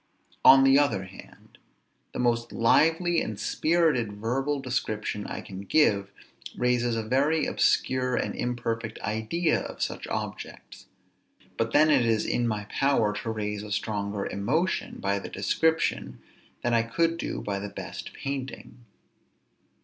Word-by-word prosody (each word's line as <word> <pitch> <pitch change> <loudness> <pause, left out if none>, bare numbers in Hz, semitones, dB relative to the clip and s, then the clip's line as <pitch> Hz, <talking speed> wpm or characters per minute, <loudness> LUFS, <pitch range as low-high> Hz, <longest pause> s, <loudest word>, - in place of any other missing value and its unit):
On 135 0 +9
the 135 +1 +6
other 140 -10 +1
hand, 95 0 -15 0.5
the - - -7
most 120 -1 0
lively 165 +8 +3
and - - -4
spirited 155 -10 +1
verbal 135 +7 -1
description 110 -5 -3
I - - -5
can 95 -1 -8
give 100 -4 +2 0.5
raises 120 -1 +1
a 115 - -2
very 140 +7 +1
obscure 125 -1 +1
and - - -1
imperfect 115 -2 -3
idea 110 +11 0
of - - -5
such - - -4
objects; - - -6 0.7
but 115 0 -1
then 155 +3 +5
it 135 -4 +4
is 115 -2 +1
in 120 -1 0
my 105 -2 -2
power 115 -6 +1
to 115 - -4
raise 105 -2 -3
a 105 0 -8
stronger 100 -1 -2
emotion 150 - -1
by 100 0 0
the - - -8
description 160 +11 0 0.4
than 120 - +1
I 115 - +4
could 165 +9 0
do - - -3
by 100 -1 -3
the 100 +1 -5
best 100 - -7
painting. 135 -2 -6
120 Hz, 140 wpm, -27 LUFS, 105-140 Hz, 0.7 s, On